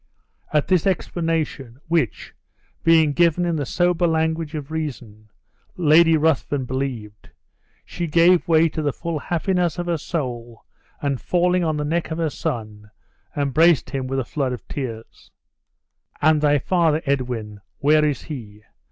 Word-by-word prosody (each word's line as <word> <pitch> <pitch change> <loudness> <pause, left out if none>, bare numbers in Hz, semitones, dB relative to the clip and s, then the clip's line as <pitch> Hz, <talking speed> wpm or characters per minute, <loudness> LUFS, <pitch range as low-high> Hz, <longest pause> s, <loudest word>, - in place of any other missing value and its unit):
At 150 -1 +1
this 185 -1 +2
explanation, 160 -8 -2
which, 160 -8 -1 0.5
being 160 -3 +4
given 175 +2 +2
in 170 -1 0
the 145 -2 -3
sober 175 -1 +1
language 160 -1 -1
of 150 0 -6
reason, 120 -9 -6 0.5
Lady 165 0 +5
Ruthven 145 -3 0
believed, 120 -5 -5 0.6
she 175 -1 -4
gave 170 +3 +4
way 165 0 +4
to 155 - -4
the 145 -3 -1
full 170 -2 -4
happiness 175 +2 -1
of 175 - -3
her 170 -2 -1
soul, 120 -8 -5 0.4
and 140 -3 -1
falling 180 0 +1
on 155 -2 0
the 150 - -2
neck 165 +3 -1
of 160 - -4
her 165 -3 -1
son, 105 -4 -5 0.5
embraced 150 +3 +3
him 135 -2 -3
with 135 +1 -2
a 130 - -1
flood 135 -1 -2
of 125 - -9
tears: 115 -5 -7 0.9
"And 155 0 +3
thy 145 -1 +3
father, 160 +1 +1
Edwin, 120 -7 -3 0.2
where 150 +2 +3
is 145 -3 -1
he? 110 -9 -9
150 Hz, 150 wpm, -22 LUFS, 130-165 Hz, 0.9 s, Lady